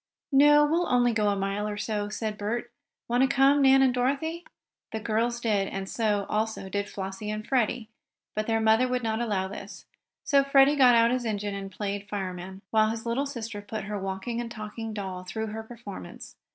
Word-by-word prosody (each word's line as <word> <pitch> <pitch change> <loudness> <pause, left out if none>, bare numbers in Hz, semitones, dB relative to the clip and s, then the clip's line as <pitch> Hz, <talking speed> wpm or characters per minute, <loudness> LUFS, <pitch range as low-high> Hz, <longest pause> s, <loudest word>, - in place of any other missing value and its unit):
"No, 295 +2 +6
we'll 330 +4 +1
only 245 -1 +3
go 210 -2 +2
a 200 - +1
mile 195 +1 -2
or 210 -1 -4
so," 210 -1 -2
said 215 0 -3
Bert. 235 +4 -3 0.4
"Want 245 +1 +2
to 265 - +5
come, 275 +2 +4
Nan 270 0 +6
and 260 -2 +3
Dorothy?" 285 +7 -1 0.4
The 220 - -3
girls 230 +2 0
did, 210 -4 +1
and 195 0 -5
so, 205 -2 0
also, 215 -2 -2
did 200 +1 -2
Flossie 195 +2 -5
and 215 0 -4
Freddie, 245 -3 0 0.5
but 215 0 -2
their 225 -1 +2
mother 220 +3 +4
would 250 -1 -1
not 220 0 -1
allow 200 -5 0
this. 190 - -9 0.4
So 280 -1 +4
Freddie 275 +1 +5
got 255 -4 +6
out 230 0 +5
his 255 0 0
engine 205 -2 -2
and 195 0 -5
played 200 +1 -4
fireman, 190 -1 -5
while 215 -1 +4
his 225 +1 -4
little 250 +5 0
sister 230 -6 -6
put 205 0 -5
her 205 +1 -4
walking 195 +5 -3
and 235 - -5
talking 220 0 -6
doll 190 -3 -5
through 220 +4 -4
her 220 - -4
performance. 220 - -10
220 Hz, 200 wpm, -27 LUFS, 205-245 Hz, 0.5 s, No